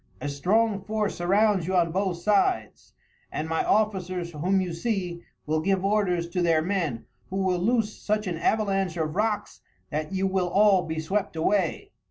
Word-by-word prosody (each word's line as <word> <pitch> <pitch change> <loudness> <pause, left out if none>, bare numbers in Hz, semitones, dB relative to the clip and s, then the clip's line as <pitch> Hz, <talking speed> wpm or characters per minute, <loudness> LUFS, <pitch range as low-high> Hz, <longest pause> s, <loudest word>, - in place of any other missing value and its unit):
A 145 - -3
strong 200 +9 +1
force 210 +1 -1
surrounds 195 0 +2
you 190 - 0
on 170 -2 +3
both 190 0 -1
sides, 210 - 0 0.4
and 155 - -3
my 160 0 0
officers, 185 -5 0
whom 180 +5 +1
you 180 -2 -2
see, 180 -2 -2 0.2
will 155 +1 0
give 195 +2 +1
orders 190 -4 +1
to 180 +1 -1
their 165 -2 +3
men, 165 -10 -2 0.2
who 190 - -5
will 185 -2 +1
loose 220 +2 0
such 215 0 0
an 175 -3 -3
avalanche 195 -2 0
of 155 -1 -2
rocks 210 +1 -1 0.3
that 155 +3 -3
you 190 0 0
will 190 -2 0
all 200 0 +5
be 160 0 -3
swept 190 +4 -2
away." 170 +1 0
185 Hz, 175 wpm, -26 LUFS, 170-205 Hz, 0.4 s, all